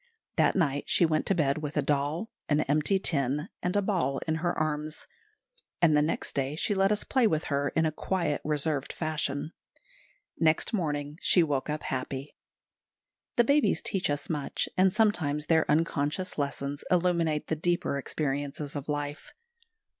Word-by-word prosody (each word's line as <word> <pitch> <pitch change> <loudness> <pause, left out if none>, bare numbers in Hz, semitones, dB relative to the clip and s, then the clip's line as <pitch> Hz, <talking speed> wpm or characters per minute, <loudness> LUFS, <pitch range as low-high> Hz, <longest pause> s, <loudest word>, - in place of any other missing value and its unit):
That - - +3
night 145 -6 +1
she 175 - +4
went 155 -1 0
to 195 - +4
bed 145 -3 +1
with 150 0 -5
a 150 - +2
doll, 150 +8 -1 0.2
an 150 0 +3
empty 155 +7 +2
tin, 150 - 0
and 180 +2 -1
a 205 - +3
ball 170 -10 0
in 160 0 +1
her 175 +2 -1
arms; 155 0 -2 0.7
and 160 -3 +5
the 150 - +5
next 155 +2 -2
day 140 +1 -1
she 205 - 0
let 195 0 +3
us 210 - 0
play 255 -4 +3
with 155 -5 0
her 140 +1 +1
in 160 - +3
a 155 - +1
quiet, 170 -1 -1
reserved 150 -2 -1
fashion. 155 -2 -2 0.9
Next 160 +6 +2
morning 150 -5 -2
she 175 - +4
woke 145 -3 -1
happy. 135 -2 -4 1.0
The 240 - +5
babies 285 +5 +2
teach 190 -5 0
us 145 0 -2
much, 150 -3 -2
and 185 0 +4
sometimes 175 -9 +1
their 160 -1 +2
unconscious 155 +3 0
lessons 140 0 -3
illuminate 170 -4 +2
the 160 - -1
deeper 170 -3 0
experiences 145 0 -3
of 145 +1 -5
life. 145 0 -4
155 Hz, 160 wpm, -28 LUFS, 145-175 Hz, 1.0 s, and